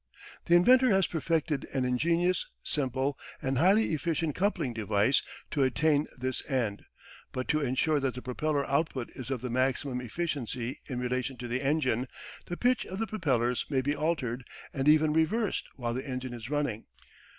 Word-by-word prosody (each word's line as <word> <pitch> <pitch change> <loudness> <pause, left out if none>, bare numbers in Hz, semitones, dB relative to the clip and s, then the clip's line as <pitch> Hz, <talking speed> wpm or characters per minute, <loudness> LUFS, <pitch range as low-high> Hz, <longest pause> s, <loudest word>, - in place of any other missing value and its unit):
The 170 - +5
inventor 255 +8 +6
has 195 -3 +4
perfected 160 -1 -1
an 130 -1 +1
ingenious, 170 +8 +1 0.2
simple, 135 -1 -1 0.2
and 130 -1 -1
highly 195 +3 +4
efficient 165 0 0
coupling 175 - 0
device 110 +3 +2 0.3
to 145 - 0
attain 145 +3 +3
this 130 0 -3
end, 115 -7 -1 0.5
but 130 0 -3
to 155 - +2
ensure 145 +3 +2
that 135 -3 -1
the 125 - -6
propeller 140 +3 -1
output 140 -3 -1
is 130 -2 -8
of 130 -4 -2
the 125 -1 -4
maximum 130 0 0
efficiency 125 -3 -3
in 125 -2 -3
relation 125 +1 -2
to 120 0 -6
the 120 +2 -1
engine, 135 -4 +1 0.4
the 175 - -4
pitch 250 0 +2
of 190 - -5
the 225 - 0
propellers 130 - 0
may 135 -3 +2
be 145 +2 0
altered 140 -6 -1 0.3
and 135 0 -1
even 155 0 +5
reversed 200 +7 +1
while 120 -3 -2
the 130 +3 -4
engine 130 -1 -4
is 120 0 -7
running. 145 -7 -1
135 Hz, 170 wpm, -30 LUFS, 125-160 Hz, 0.5 s, inventor